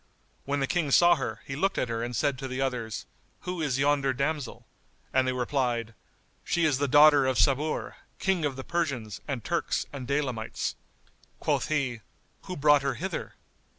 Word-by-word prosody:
When 140 Hz, 0 st, -1 dB
the -, -, +3 dB
King 160 Hz, +1 st, 0 dB
saw 175 Hz, +5 st, +6 dB
her, 125 Hz, -6 st, -3 dB
he 135 Hz, -, -5 dB
looked 195 Hz, +7 st, 0 dB
at -, -, 0 dB
her 115 Hz, -1 st, -2 dB
and 120 Hz, +1 st, -3 dB
said 140 Hz, -1 st, 0 dB
to 135 Hz, -, -4 dB
the 130 Hz, 0 st, -4 dB
others, 120 Hz, -6 st, -2 dB, 0.4 s
"Who 180 Hz, -2 st, -4 dB
is 140 Hz, -4 st, 0 dB
yonder 140 Hz, -1 st, +2 dB
damsel?"; 140 Hz, 0 st, -3 dB, 0.5 s
and 130 Hz, 0 st, +3 dB
they -, -, +2 dB
replied, 125 Hz, -3 st, -1 dB, 0.5 s
"She 170 Hz, -1 st, +1 dB
is 145 Hz, -4 st, +2 dB
the 145 Hz, -, +1 dB
daughter 145 Hz, 0 st, +7 dB
of 130 Hz, -1 st, +1 dB
Sabur, 145 Hz, +2 st, +1 dB, 0.2 s
King 190 Hz, -4 st, 0 dB
of 145 Hz, -3 st, 0 dB
the 130 Hz, -, -6 dB
Persians 135 Hz, -, -2 dB
and 135 Hz, -6 st, -3 dB
Turks -, -, -1 dB
and 130 Hz, -3 st, -6 dB
Daylamites." 130 Hz, -5 st, -2 dB, 0.7 s
Quoth -, -, 0 dB
he, 135 Hz, -7 st, -1 dB, 0.4 s
"Who 185 Hz, -1 st, -5 dB
brought 145 Hz, 0 st, +5 dB
her 135 Hz, -2 st, -1 dB
hither?" 185 Hz, +3 st, -5 dB
140 Hz, 180 wpm, -28 LUFS, 125-150 Hz, 0.7 s, daughter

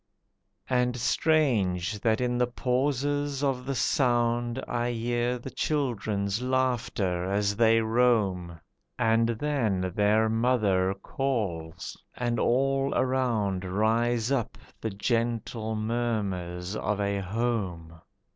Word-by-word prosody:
And 125 Hz, -1 st, +2 dB
strange 115 Hz, -, +1 dB
that 110 Hz, +2 st, +1 dB
in 125 Hz, -1 st, 0 dB
the 125 Hz, -, +3 dB
pauses 140 Hz, +3 st, -1 dB
of 130 Hz, -2 st, -1 dB
the 135 Hz, -, -1 dB
sound 120 Hz, -2 st, +1 dB
I 120 Hz, 0 st, -1 dB
hear 120 Hz, +1 st, -1 dB
the 125 Hz, +2 st, -8 dB
children's 110 Hz, -7 st, -1 dB
laughter 120 Hz, -8 st, 0 dB
as 100 Hz, +1 st, +1 dB
they 115 Hz, +1 st, +4 dB
roam, 110 Hz, -7 st, +1 dB, 0.4 s
And 115 Hz, 0 st, +3 dB
then 110 Hz, -8 st, 0 dB
their 105 Hz, +2 st, +3 dB
mother 110 Hz, -5 st, +2 dB
calls, 90 Hz, -11 st, -3 dB, 0.2 s
and 120 Hz, -1 st, -1 dB
all 135 Hz, +2 st, +1 dB
around 115 Hz, -8 st, 0 dB
Rise 110 Hz, +5 st, +1 dB
up 130 Hz, -5 st, -1 dB, 0.2 s
the 110 Hz, -, -1 dB
gentle 115 Hz, +1 st, -1 dB
murmurs 105 Hz, -5 st, -2 dB
of 105 Hz, 0 st, -1 dB
a 100 Hz, 0 st, 0 dB
home. 95 Hz, -6 st, -3 dB
115 Hz, 110 wpm, -27 LUFS, 100-125 Hz, 0.4 s, they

